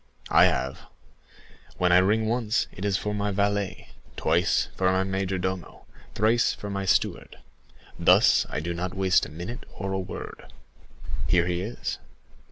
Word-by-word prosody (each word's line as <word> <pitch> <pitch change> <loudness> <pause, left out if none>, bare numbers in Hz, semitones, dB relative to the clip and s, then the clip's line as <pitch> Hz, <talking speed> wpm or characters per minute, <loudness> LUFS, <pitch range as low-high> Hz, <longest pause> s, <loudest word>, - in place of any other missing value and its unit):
I - - +7
have. 65 - 0 1.0
When 90 0 +2
I 90 - +7
ring 105 +4 +2
once, 115 -1 0
it 95 - -7
is 100 -2 +1
for 105 - -3
my 105 0 -1
valet; 100 0 -1 0.3
twice, 85 +3 +1
for 95 -1 +2
my 95 0 +2
majordomo; 95 -2 -3 0.3
thrice, 110 +3 +3
for 105 - -7
my 100 0 -3
steward,—thus 95 - +1
I 75 - -3
do 85 +2 -3
not 90 +1 -4
waste 95 -1 +3
a - - -11
minute 85 +10 -7
or 95 -1 -4
a 95 - -1
word. 95 - -8 0.8
Here 85 -1 +3
he 90 0 -1
is." 110 +6 -4
95 Hz, 150 wpm, -26 LUFS, 90-105 Hz, 1.0 s, I